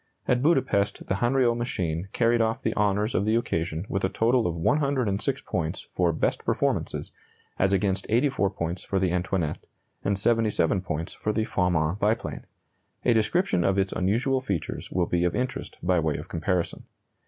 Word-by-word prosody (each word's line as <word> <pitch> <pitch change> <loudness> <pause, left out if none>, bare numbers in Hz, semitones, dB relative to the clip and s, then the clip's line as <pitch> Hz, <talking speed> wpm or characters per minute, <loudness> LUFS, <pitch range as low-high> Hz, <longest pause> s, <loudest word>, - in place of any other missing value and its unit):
At 125 -1 +2
Budapest 115 -10 +1
the - - -1
Hanriot 120 +1 +2
machine 90 -8 -2
carried 115 0 +2
off 115 +3 0
the - - 0
honors 105 +2 +1
of 95 - +1
the 110 +2 +2
occasion 85 -6 -1
with 95 - -2
a 95 - +2
total 115 +4 +2
of 85 - -2
106 135 - +1
points 85 0 -2
for 90 -2 +2
"best 80 - -1
performances," - - -1 0.5
as 95 +1 +3
against 95 0 +1
84 120 -3 +2
points 85 -2 -4
for 100 - -2
the 95 -2 +1
Antoinette, 90 -3 -1 0.4
and 100 0 +1
77 110 -2 +2
points 80 -2 -4
for 105 - -2
the 110 +1 0
Farman 90 -3 +1
biplane. 110 +3 -1 0.6
A 120 - +5
description 110 - +2
of 95 +2 +2
its 95 0 +1
unusual 120 +8 +1
features 100 - -3
will 90 -1 +1
be 85 0 0
of 90 - +1
interest 125 0 -3
by 90 0 +3
way 80 -2 0
of - - -8
comparison. 85 +1 -2
100 Hz, 170 wpm, -26 LUFS, 90-115 Hz, 0.6 s, A